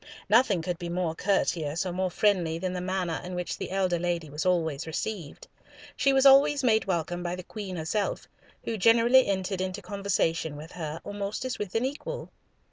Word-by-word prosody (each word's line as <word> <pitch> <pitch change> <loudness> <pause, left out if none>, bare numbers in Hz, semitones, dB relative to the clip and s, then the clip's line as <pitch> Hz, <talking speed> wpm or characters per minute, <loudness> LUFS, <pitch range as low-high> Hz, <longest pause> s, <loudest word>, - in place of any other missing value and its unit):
Nothing 215 -6 +4
could 175 0 -3
be 175 - -5
more 175 -2 -1
courteous 170 -3 0
or 180 - -2
more 185 +1 0
friendly 175 -3 +1
than 185 +1 -3
the 180 - -3
manner 180 -2 -2
in 180 0 -6
which 180 0 -3
the - - -4
elder 185 -2 0
lady 170 -3 -2
was 150 +5 -2
always 160 -4 0
received. 165 -1 -5 0.5
She 275 - +3
was 270 0 +3
always 275 +1 +6
made 220 -3 +3
welcome 175 -1 -1
by 175 0 -2
the 185 - -8
Queen 195 -1 -6
herself, 175 +6 -2 0.4
who 230 - -3
generally 235 +5 +5
entered 190 -1 -1
into 185 +2 -3
conversation 180 -6 -1
with 155 +3 -10
her 160 -2 -5
almost 205 +3 -4
as 255 - -3
with 205 -1 -5
an 225 +3 +2
equal. - - -5
185 Hz, 190 wpm, -28 LUFS, 170-210 Hz, 0.5 s, always